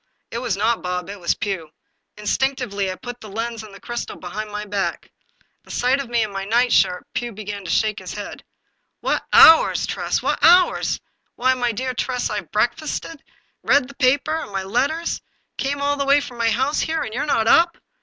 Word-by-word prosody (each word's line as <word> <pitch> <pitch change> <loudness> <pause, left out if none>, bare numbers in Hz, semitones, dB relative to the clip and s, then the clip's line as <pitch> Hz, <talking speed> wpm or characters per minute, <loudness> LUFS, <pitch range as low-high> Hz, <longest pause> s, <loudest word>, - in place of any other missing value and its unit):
It 230 - -3
was 235 -6 -2
not 225 +3 +1
Bob, 180 +1 -3
it 200 - -9
was 170 - 0
Pugh. 190 -6 -4 0.5
Instinctively 210 -3 -1
I - - -5
put 245 +3 -9
the 215 - -10
lens 230 +2 -4
and 215 -1 -11
the 195 - -13
crystal 240 +4 -5
behind 210 +4 -6
my 210 0 -5
back. 195 -4 -3 0.5
At - - -13
sight 255 +3 +2
of 275 -4 -5
me 235 -2 +2
in 215 - -4
my 195 0 -4
nightshirt 225 -4 +2
Pugh 240 -2 -3
began 205 -1 -6
to - - -6
shake 215 +4 +1
his - - -7
head. - - -7 0.3
" - - -50
What - - 0
hours, 325 0 +7
Tress, - - -2
what - - 0
hours! 355 +2 +4 0.4
Why, 255 +1 +3
my 245 -2 0
dear 255 +4 -3
Tress, 250 0 -2
I've 205 -6 -4
breakfasted, 280 +7 -2 0.4
read 280 -3 +3
the 280 - -12
papers 280 +4 +1
and - - -8
my 195 -1 -2
letters, 270 - -1 0.4
came 280 +1 -1
all 285 0 +1
the 280 - -1
way 280 +1 +5
from 245 -4 -8
my 230 -1 +3
house 265 +7 +1
here, 320 0 -1
and 220 - -6
you're 280 +5 -2
not 225 -6 +2
up 340 +7 +5
235 Hz, 205 wpm, -21 LUFS, 205-270 Hz, 0.5 s, hours